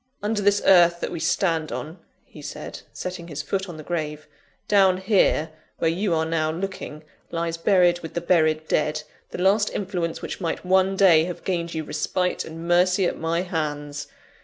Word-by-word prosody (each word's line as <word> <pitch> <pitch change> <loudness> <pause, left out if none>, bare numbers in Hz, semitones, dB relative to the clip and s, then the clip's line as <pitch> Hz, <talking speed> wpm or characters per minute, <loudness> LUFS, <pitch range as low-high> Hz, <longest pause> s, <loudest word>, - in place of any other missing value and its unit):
"Under 210 0 0
this 205 0 +2
earth 175 -2 +6
that - - -3
we 170 - -4
stand 165 -1 0
on," 160 +4 -6 0.3
he - - -13
said, - - -7
setting 180 -2 -6
his 150 -3 -5
foot 195 -1 -2
on 165 - -8
the 155 - -8
grave; 150 -2 -4 0.4
"down 195 -3 +4
here, 190 -5 +2 0.3
where 165 - +1
you 180 0 0
are 160 0 +1
now 160 -1 0
looking, 170 -3 -6 0.3
lies 165 -1 -2
buried 175 0 +3
with 165 -2 -9
the - - +1
buried 155 -3 +2
dead, 150 0 0 0.3
the - - -7
last 200 +4 +3
influence 180 -4 -3
which - - -6
might 170 +1 -3
one 190 +1 +3
day 175 -5 +6
have 175 -1 -6
gained 170 -3 -2
you 160 - -2
respite 180 +4 -1
and 165 +1 -8
mercy 180 +2 +3
at - - -2
my 165 +1 0
hands. 145 -4 -4
170 Hz, 185 wpm, -24 LUFS, 160-185 Hz, 0.4 s, earth